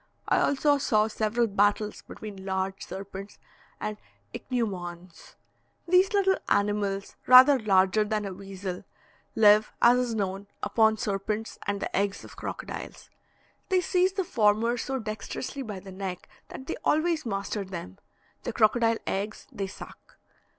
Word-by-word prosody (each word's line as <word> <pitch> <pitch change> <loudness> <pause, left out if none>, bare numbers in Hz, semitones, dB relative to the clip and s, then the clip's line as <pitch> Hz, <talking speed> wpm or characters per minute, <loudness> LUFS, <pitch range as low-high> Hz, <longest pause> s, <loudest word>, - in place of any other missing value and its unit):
I - - +3
also 285 0 +2
saw 215 -5 +3
several 220 +2 0
battles 205 0 +1
between 200 -3 -9
large 190 0 -2
serpents 195 +1 -8 0.4
and 215 0 -4 0.4
ichneumons. 180 -8 -5 0.5
These 365 +3 +4
little 385 -1 +3
animals, 200 -1 0
rather 260 +2 +9
larger 195 -1 +3
than 210 0 -2
a 195 - -4
weasel, 190 -1 -6 0.5
live, 210 0 +6
as 245 +1 +6
is 245 -2 -1
known, 195 -1 -3 0.2
upon 220 -1 +3
serpents 210 +2 -3
and 200 0 -1
the - - -3
eggs 200 0 0
of - - -12
crocodiles. - - -7 0.6
They 375 -1 +4
seize 365 +1 +2
the 385 -1 -1
former 230 - +2
so 265 +3 -3
dexterously 220 +4 -5
by 210 -6 -6
the 190 +1 -11
neck 185 -1 -6 0.2
that 265 - -9
they - - -4
always 320 +1 +2
master 200 -1 -3
them; 170 - -8 0.4
the - - -4
crocodile 230 +1 +3
eggs 205 +3 -3
they 195 -1 -4
suck. - - -12
210 Hz, 140 wpm, -27 LUFS, 195-240 Hz, 0.6 s, rather